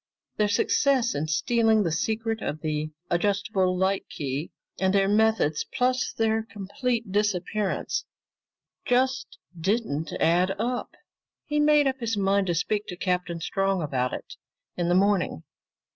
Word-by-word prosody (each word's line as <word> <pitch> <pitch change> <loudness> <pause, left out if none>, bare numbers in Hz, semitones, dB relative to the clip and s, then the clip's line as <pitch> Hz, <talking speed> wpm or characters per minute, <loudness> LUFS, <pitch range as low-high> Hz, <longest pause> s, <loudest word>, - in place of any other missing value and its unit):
Their 210 - +3
success 255 +4 +2
in 150 +2 -2
stealing 220 +8 +2
the 170 - -1
secret 220 +6 -1
of 150 +1 -4
the 155 0 -2 0.2
adjustable 190 0 +1
light 190 +1 0
key, 140 +2 -4 0.3
and 190 +1 +2
their 195 -1 +4
methods, 210 -7 +2
plus 255 0 +1
their 225 0 +1
complete 220 +2 -3
disappearance, 210 - -1 0.8
just 260 +2 0 0.2
didn't 165 -4 -1
add 180 +3 +3
up. 245 +4 -3 0.5
He 295 0 0
made 295 -1 +5
up 265 -1 0
his 230 -3 -2
mind 195 0 +2
to 175 - +1
speak 210 +5 -1
to 180 - -5
Captain 180 -2 -1
Strong 195 +1 0
about 130 -4 -1
it - - -7 0.4
in 175 -1 -1
the 175 - +3
morning. 190 - +2
200 Hz, 140 wpm, -26 LUFS, 175-225 Hz, 0.8 s, made